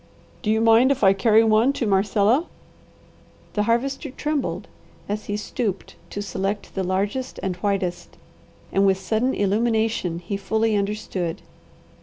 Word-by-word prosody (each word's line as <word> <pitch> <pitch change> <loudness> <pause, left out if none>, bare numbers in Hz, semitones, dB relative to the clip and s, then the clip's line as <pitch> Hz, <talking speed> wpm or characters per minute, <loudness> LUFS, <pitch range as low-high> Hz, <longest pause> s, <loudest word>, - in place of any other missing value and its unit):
"Do 215 - -2
you 220 +1 +2
mind 230 +4 +5
if 270 - -1
I 195 0 +7
carry 220 +2 +4
one 225 +4 +4
to 260 - -2
Marcella?" 205 - +2 1.1
The 210 - +1
Harvester 270 +5 0
trembled 295 +1 -3 0.4
as 210 +1 -3
he 205 - -2
stooped 210 -2 -4
to 205 - -4
select 200 +1 -3
the 190 - -2
largest 200 +8 -2
and 190 -2 -1
whitest, 190 -2 -2 0.5
and 195 - +2
with 190 -1 +3
sudden 220 +7 0
illumination, 220 -3 0
he 180 +3 -4
fully 220 +2 0
understood. 200 -4 -2
210 Hz, 140 wpm, -23 LUFS, 195-230 Hz, 1.1 s, I